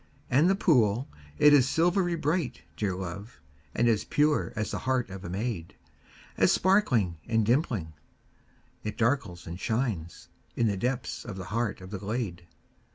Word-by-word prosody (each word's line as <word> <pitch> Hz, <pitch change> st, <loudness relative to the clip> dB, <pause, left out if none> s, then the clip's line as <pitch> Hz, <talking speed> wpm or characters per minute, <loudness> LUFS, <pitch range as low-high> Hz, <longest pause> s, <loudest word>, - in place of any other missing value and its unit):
And 145 Hz, +8 st, +5 dB
the 195 Hz, -, +4 dB
pool, 125 Hz, -, +3 dB, 0.3 s
it 150 Hz, -, +7 dB
is 135 Hz, -2 st, +5 dB
silvery 175 Hz, +2 st, +2 dB
bright, 150 Hz, -, -1 dB
dear 95 Hz, -1 st, -1 dB
love, 95 Hz, +5 st, -7 dB, 0.4 s
And 120 Hz, -, +3 dB
as 110 Hz, -3 st, +2 dB
pure 150 Hz, 0 st, +1 dB
as 110 Hz, -1 st, -2 dB
the -, -, -3 dB
heart 130 Hz, -4 st, -1 dB
of 95 Hz, 0 st, -8 dB
a 85 Hz, -, -6 dB
maid, 95 Hz, -2 st, -4 dB, 0.6 s
As -, -, +4 dB
sparkling 125 Hz, -, +2 dB
and 110 Hz, -2 st, +2 dB
dimpling, 115 Hz, -, 0 dB, 0.9 s
it 105 Hz, -, -4 dB
darkles 110 Hz, -, 0 dB
and 85 Hz, +2 st, -7 dB
shines 110 Hz, -9 st, -2 dB, 0.3 s
In 120 Hz, -, +1 dB
the 105 Hz, -3 st, +1 dB
depths 125 Hz, +3 st, -2 dB
of 105 Hz, -5 st, -7 dB
the 95 Hz, -, -6 dB
heart 115 Hz, -4 st, -1 dB
of 90 Hz, +1 st, -10 dB
the 100 Hz, -, -4 dB
glade. 100 Hz, -5 st, -4 dB
115 Hz, 160 wpm, -28 LUFS, 95-135 Hz, 0.9 s, it